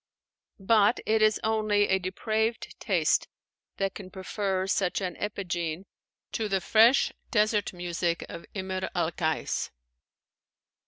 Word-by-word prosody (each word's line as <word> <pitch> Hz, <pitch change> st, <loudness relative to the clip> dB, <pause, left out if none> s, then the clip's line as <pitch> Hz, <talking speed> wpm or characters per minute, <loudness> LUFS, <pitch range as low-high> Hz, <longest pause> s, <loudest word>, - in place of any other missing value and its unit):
But 210 Hz, +3 st, +4 dB
it 220 Hz, 0 st, +2 dB
is 215 Hz, -1 st, +4 dB
only 215 Hz, -2 st, +2 dB
a 190 Hz, -, +2 dB
depraved 220 Hz, +5 st, -2 dB
taste -, -, +2 dB, 0.5 s
that 195 Hz, -1 st, -1 dB
can 190 Hz, -3 st, -9 dB
prefer 190 Hz, 0 st, -2 dB
such 190 Hz, -1 st, 0 dB
an 185 Hz, -3 st, -3 dB
epigene 175 Hz, -4 st, -3 dB, 0.5 s
to 220 Hz, -2 st, -2 dB
the 195 Hz, -1 st, +2 dB
fresh 225 Hz, +7 st, +5 dB, 0.2 s
desert 210 Hz, -1 st, +2 dB
music 175 Hz, -2 st, -2 dB
of 170 Hz, -, -9 dB
Imr 190 Hz, -1 st, -3 dB
al 170 Hz, -2 st, +1 dB
Kais. 160 Hz, -1 st, -1 dB
195 Hz, 120 wpm, -28 LUFS, 180-215 Hz, 0.5 s, fresh